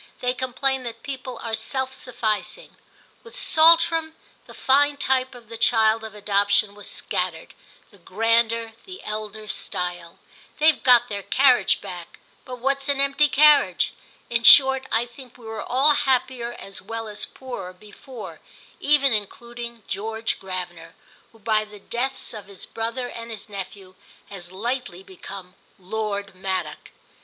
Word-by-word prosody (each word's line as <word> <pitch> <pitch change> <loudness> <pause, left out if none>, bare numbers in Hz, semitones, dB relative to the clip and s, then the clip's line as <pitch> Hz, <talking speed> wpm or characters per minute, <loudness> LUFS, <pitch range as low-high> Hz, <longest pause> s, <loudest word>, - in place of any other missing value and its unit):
They 250 0 0
complain 260 +1 -1
that 230 -1 -8
people 260 -3 -6
are 230 - -4
self 260 +4 -1
sufficing. 240 - -3 0.5
With 465 0 -14
Saltram 330 -3 +4 0.3
the - - -12
fine 285 +2 +3
type 260 -2 0
of 240 -2 -14
the 230 0 -9
child 225 -1 +3
of 220 -1 -8
adoption 205 0 +1
was 205 0 -8
scattered, - - -2 0.4
the 200 - -19
grander, 225 +4 +1
the 375 0 -10
elder 215 0 -6
style. 175 -3 -2 0.4
They've 310 0 +4
got 250 -2 +6
their 200 -1 -4
carriage 250 -3 +3
back, 175 -2 -9 0.3
but 250 -1 -7
what's 275 +3 -1
an 280 -1 +1
empty 275 +2 +3
carriage? 295 +1 +4 0.3
In 230 -1 0
short 265 +2 +7
I 230 +2 +2
think 245 0 -14
we 240 - -15
were 220 0 -5
all 275 +4 +3
happier 255 -4 0
as 195 -4 -8
well 225 +2 -6
as 210 0 -5
poorer 245 -9 -7
before; 215 +6 -11 0.4
even 285 -3 +3
including 235 +2 -5
George 220 +2 -3
Gravener, 180 -3 -7 0.4
who 225 - -20
by 215 0 +1
the 210 -1 -13
deaths 255 +6 -3
of 210 -2 -9
his 200 -2 -9
brother 235 +3 -4
and 230 -1 -8
his 220 -3 -7
nephew 195 -1 -8 0.4
has 180 -3 -7
lately 235 -2 -4
become 190 0 -10 0.2
Lord 200 +1 -4
Maddock. 190 0 -4
230 Hz, 145 wpm, -23 LUFS, 205-260 Hz, 0.5 s, short